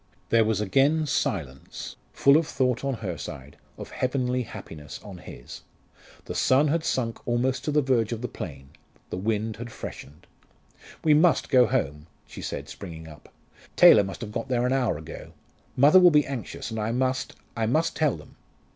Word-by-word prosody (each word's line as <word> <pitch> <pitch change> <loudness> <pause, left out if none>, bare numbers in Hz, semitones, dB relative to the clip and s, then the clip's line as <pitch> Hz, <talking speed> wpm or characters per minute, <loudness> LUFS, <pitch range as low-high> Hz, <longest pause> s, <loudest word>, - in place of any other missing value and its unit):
There 115 -1 +5
was 110 -2 0
again 135 +10 +2
silence, 75 - -3 0.2
full 140 0 +4
of 160 0 +3
thought 125 -2 0
on 135 -1 -1
her 90 -3 -4
side, 70 +1 -8 0.2
of - - -9
heavenly 125 -1 -1
happiness 75 - -9
on - - -10
his. - - -11 0.6
The - - -5
sun 140 +3 +3
had 160 +2 0
sunk 115 -7 -1
almost 125 +2 0
to 150 - 0
the 150 0 +2
verge 120 -5 +1
of 115 0 -4
the - - -1
plain, 70 - -8 0.4
the - - -3
wind 110 +2 -2
had 120 0 -7
freshened. 75 -7 -9 0.8
"We 155 - +5
must 160 +3 +3
go 125 -3 +5
home," 75 -3 -2 0.2
she - - -10
said, - - -5
springing 80 -4 -9
up. 75 -1 -14 0.5
"Taylor 105 - +8
must 95 0 -7
have 110 -3 -6
got 115 +4 -4
there 125 -2 0
an 125 - +1
hour 125 - +1
ago. 80 +1 -10 0.4
Mother 145 +8 +7
will 180 -1 +8
be 150 -3 +4
anxious, 130 -3 -6
and 110 - -3
I 110 +1 -1
must 130 +1 -1 0.2
I 115 -1 0
must 155 +8 +1
tell 150 - +1
them." 75 - -16
120 Hz, 180 wpm, -26 LUFS, 95-135 Hz, 0.8 s, Taylor